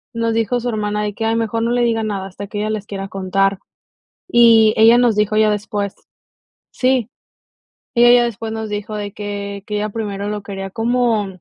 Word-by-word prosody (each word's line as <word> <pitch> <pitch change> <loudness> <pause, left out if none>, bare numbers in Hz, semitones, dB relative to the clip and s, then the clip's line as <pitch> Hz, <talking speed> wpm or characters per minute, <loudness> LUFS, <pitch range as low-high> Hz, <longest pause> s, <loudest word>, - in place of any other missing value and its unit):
nos 230 0 0
dijo 225 +2 0
su 245 - -4
hermana 210 -2 -2
de 210 0 -3
que: 225 +2 -4
"Ay, 225 0 +1
mejor 225 0 -1
no 230 - 0
le 245 0 +2
diga 230 -1 +1
nada 200 -3 -3
hasta 195 +2 -8
que 205 - -7
ella 215 +1 -1
les 210 -2 -4
quiera 195 -1 -5
contar." 195 0 0 0.7
Y 225 -5 +6
ella 225 +2 +7
nos 240 -3 +3
dijo 210 0 +1
ya 215 0 +4
después, 205 -1 -3 0.8
sí, 255 -3 +1 0.9
ella 240 0 +6
ya 245 0 +5
después 225 -1 -5
nos 220 -1 -4
dijo 210 +1 -4
de 205 -1 -4
que 200 -1 -6
que 210 - -3
ella 210 +1 -1
primero 205 -2 -4
lo 210 0 -4
quería 195 -1 -6
como, 230 -1 +1
215 Hz, 200 wpm, -18 LUFS, 205-230 Hz, 0.9 s, ella